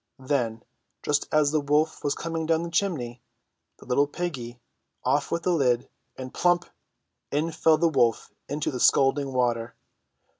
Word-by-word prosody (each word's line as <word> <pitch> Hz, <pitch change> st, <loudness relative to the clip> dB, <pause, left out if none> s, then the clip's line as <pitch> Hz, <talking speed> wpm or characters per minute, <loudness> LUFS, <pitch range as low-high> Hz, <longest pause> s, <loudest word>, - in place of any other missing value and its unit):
Then, 120 Hz, -6 st, -1 dB, 0.4 s
just 145 Hz, 0 st, 0 dB
as 150 Hz, -2 st, +3 dB
the 155 Hz, -1 st, +1 dB
wolf 150 Hz, +2 st, +1 dB
was 145 Hz, 0 st, 0 dB
coming 165 Hz, -1 st, -3 dB
down 165 Hz, 0 st, +2 dB
the 170 Hz, -, -5 dB
chimney, 150 Hz, -, -1 dB, 0.6 s
the -, -, -15 dB
little 140 Hz, +3 st, +2 dB
piggy 135 Hz, -7 st, -5 dB, 0.4 s
off -, -, +1 dB
with 170 Hz, -, -2 dB
the 180 Hz, -, +2 dB
lid, 125 Hz, -6 st, +2 dB, 0.3 s
and 130 Hz, -1 st, -7 dB
plump! 175 Hz, 0 st, +2 dB, 0.6 s
in 155 Hz, +4 st, -1 dB
fell 160 Hz, 0 st, +3 dB
the 170 Hz, +2 st, +3 dB
wolf 125 Hz, -8 st, +1 dB, 0.2 s
into 145 Hz, +1 st, -2 dB
the 125 Hz, -, -4 dB
scalding 135 Hz, +1 st, +3 dB
water. 120 Hz, -2 st, 0 dB
145 Hz, 155 wpm, -26 LUFS, 125-160 Hz, 0.6 s, as